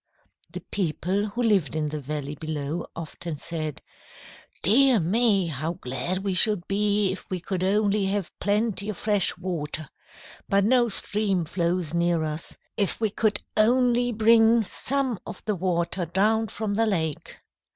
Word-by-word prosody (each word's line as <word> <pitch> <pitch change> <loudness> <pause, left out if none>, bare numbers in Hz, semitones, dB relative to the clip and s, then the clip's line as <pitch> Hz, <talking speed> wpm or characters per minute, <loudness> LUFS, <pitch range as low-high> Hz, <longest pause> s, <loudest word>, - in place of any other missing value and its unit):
"The - - -7
people 190 +2 -1
who 235 +4 -3
lived 195 - +2
in 155 -1 -1
the 150 0 -4
valley 145 +1 -4
below 155 +1 -4
often 165 0 -6
said, 155 -3 -5 0.8
'Dear 255 +3 +5
me! 200 +2 +3
how 160 +1 -3
glad 170 +4 -3
we 195 -2 -1
should 190 -1 +3
be 205 0 +1
if 190 - -8
we 185 - -2
could 185 +1 -3
only 205 +1 +2
have 195 -2 -2
plenty 205 -1 0
of 210 - -4
fresh 205 -4 +2
water. 155 -5 -4 0.6
But 200 0 +3
no 240 +2 +3
stream 200 -3 0
flows 170 -1 -1
near 170 -1 +1
us. 155 +1 -5 0.2
If 200 -2 0
we 220 -2 0
could 210 -1 0
only 245 +2 +3
bring 225 +1 +5
some 260 +2 -1
of - - -9
the 215 - 0
water 175 -1 -1
down 215 +6 +2
from 210 0 -3
the 225 +2 +2
lake!' 160 -7 -2
195 Hz, 150 wpm, -25 LUFS, 170-215 Hz, 0.8 s, Dear